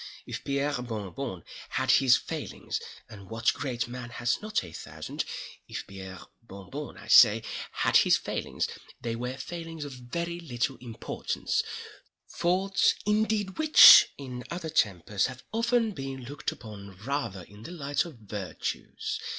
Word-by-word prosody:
If -, -, -6 dB
Pierre 140 Hz, -1 st, 0 dB
Bon 110 Hz, -6 st, -5 dB
Bon 125 Hz, -, -5 dB, 0.3 s
had -, -, +1 dB
his 130 Hz, -2 st, +6 dB
failings—and 100 Hz, -3 st, -7 dB
what 115 Hz, 0 st, +1 dB
great 120 Hz, -5 st, -3 dB
man 120 Hz, 0 st, -7 dB
has 120 Hz, 0 st, -1 dB
not 215 Hz, -, -1 dB
a 90 Hz, -, -10 dB
thousand?—if 80 Hz, -, -6 dB
Pierre 95 Hz, -2 st, -9 dB, 0.2 s
Bon 100 Hz, -3 st, -12 dB
Bon, 145 Hz, +2 st, -6 dB
I -, -, -12 dB
say, -, -, +7 dB, 0.3 s
had -, -, +3 dB
his -, -, +5 dB
failings, -, -, -3 dB, 0.3 s
they 115 Hz, -1 st, -3 dB
were 125 Hz, +2 st, -4 dB
failings 165 Hz, +2 st, -6 dB
of 140 Hz, -, -7 dB
very 170 Hz, +8 st, -4 dB
little 130 Hz, -4 st, -2 dB
importance—faults 175 Hz, -, -1 dB
indeed 210 Hz, -1 st, +1 dB
which, 310 Hz, -1 st, +10 dB
in 125 Hz, -3 st, -7 dB
other 170 Hz, -2 st, -4 dB
tempers, 100 Hz, -, +1 dB
have 130 Hz, -1 st, -9 dB
often 230 Hz, 0 st, +2 dB
been 135 Hz, -5 st, -6 dB
looked 145 Hz, +3 st, -3 dB
upon 100 Hz, -4 st, -10 dB
rather 120 Hz, -9 st, -2 dB
in 105 Hz, +4 st, -15 dB
the 115 Hz, -, -8 dB
light 145 Hz, -4 st, -1 dB
of 170 Hz, -5 st, -10 dB
virtues. 105 Hz, -4 st, -5 dB
130 Hz, 140 wpm, -28 LUFS, 110-165 Hz, 0.3 s, which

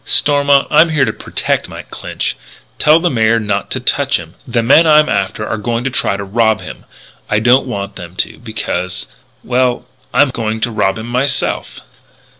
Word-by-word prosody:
"Stormont, 145 Hz, -1 st, +3 dB
I'm 165 Hz, +1 st, +5 dB
here 150 Hz, -4 st, +2 dB
to 110 Hz, -, -2 dB
protect -, -, -2 dB
Mike -, -, -10 dB
Clinch. -, -, -3 dB, 0.4 s
Tell 155 Hz, +1 st, +5 dB
the 175 Hz, +1 st, 0 dB
Mayor 115 Hz, -1 st, +2 dB
not 105 Hz, -2 st, -2 dB
to -, -, -2 dB
touch -, -, +1 dB
him. -, -, -10 dB
The 120 Hz, -1 st, 0 dB
men 155 Hz, +7 st, +5 dB
I'm 155 Hz, 0 st, +5 dB
after 100 Hz, +1 st, -2 dB
are 110 Hz, -, -3 dB
going 115 Hz, +2 st, -2 dB
to 135 Hz, -, -2 dB
try 100 Hz, -5 st, 0 dB
to 100 Hz, -, -5 dB
rob 110 Hz, +2 st, +1 dB
him. -, -, -10 dB, 0.4 s
I 105 Hz, -, +2 dB
don't 125 Hz, +5 st, +3 dB
want 100 Hz, -4 st, -5 dB
them 85 Hz, -1 st, -10 dB
to -, -, -2 dB
because 90 Hz, -5 st, -4 dB, 0.4 s
well, 125 Hz, 0 st, 0 dB, 0.3 s
I'm 135 Hz, +2 st, +3 dB
going 110 Hz, -2 st, -3 dB
to 120 Hz, -, 0 dB
rob 95 Hz, -2 st, 0 dB
him 110 Hz, -, -6 dB
myself." 125 Hz, +3 st, -1 dB
115 Hz, 185 wpm, -15 LUFS, 105-135 Hz, 0.4 s, I'm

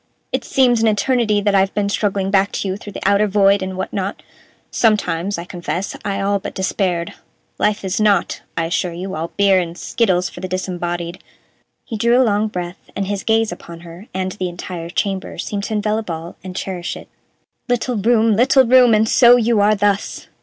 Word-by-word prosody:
"It -, -, -1 dB
seems 245 Hz, -4 st, +3 dB
an 225 Hz, -, +3 dB
eternity 215 Hz, 0 st, +2 dB
that 205 Hz, 0 st, +1 dB
I've 195 Hz, 0 st, +2 dB
been 205 Hz, -1 st, +1 dB
struggling 200 Hz, -1 st, -1 dB
back 195 Hz, 0 st, +3 dB
to -, -, -2 dB
you 190 Hz, -, -1 dB
through 205 Hz, 0 st, -10 dB
the -, -, -3 dB
outer 200 Hz, +1 st, +3 dB
void 200 Hz, 0 st, +3 dB
and 190 Hz, 0 st, -4 dB
what 190 Hz, -, -4 dB
not. 195 Hz, 0 st, -3 dB, 0.5 s
Sometimes, 200 Hz, -4 st, +1 dB
I 170 Hz, -, -5 dB
confess 180 Hz, +1 st, -4 dB
I 200 Hz, -1 st, -2 dB
all 200 Hz, 0 st, +1 dB
but 195 Hz, -, -7 dB
despaired. 185 Hz, -3 st, -1 dB, 0.5 s
Life 210 Hz, -2 st, 0 dB
is 190 Hz, +3 st, -1 dB
not, 205 Hz, -4 st, +2 dB, 0.2 s
I 165 Hz, -, +1 dB
assure 175 Hz, +1 st, -1 dB
you, 185 Hz, +3 st, -6 dB
all 165 Hz, 0 st, -3 dB
beer 200 Hz, -2 st, +4 dB
and 170 Hz, -1 st, -4 dB
skittles 185 Hz, -6 st, +1 dB
for 175 Hz, -, -10 dB
the 185 Hz, -, -4 dB
disembodied." 175 Hz, -1 st, -4 dB, 0.6 s
He 225 Hz, -, -5 dB
drew 235 Hz, +3 st, +3 dB
a -, -, +6 dB
long 210 Hz, 0 st, +1 dB
breath, 180 Hz, -3 st, -7 dB
and 200 Hz, -, -1 dB
his 200 Hz, 0 st, -3 dB
gaze 225 Hz, -2 st, +2 dB
upon 170 Hz, -1 st, -10 dB
her 170 Hz, +5 st, -12 dB
and 185 Hz, 0 st, -2 dB
the 185 Hz, -2 st, -3 dB
entire 175 Hz, -1 st, -7 dB
chamber 195 Hz, 0 st, -3 dB
seemed 200 Hz, -1 st, -3 dB
to 220 Hz, -, -4 dB
envelop 215 Hz, 0 st, -1 dB
all 165 Hz, +1 st, -6 dB
and 185 Hz, -1 st, -8 dB
cherish 180 Hz, -2 st, -4 dB
it. -, -, -12 dB, 0.6 s
"Little 245 Hz, 0 st, 0 dB
room, 225 Hz, +1 st, +3 dB
little 260 Hz, +3 st, +5 dB
room! 245 Hz, -2 st, +6 dB
And 215 Hz, +1 st, +3 dB
so 240 Hz, +1 st, +7 dB
you 235 Hz, -2 st, +2 dB
are 210 Hz, +1 st, +4 dB
thus! 205 Hz, 0 st, -1 dB
200 Hz, 200 wpm, -19 LUFS, 185-215 Hz, 0.6 s, so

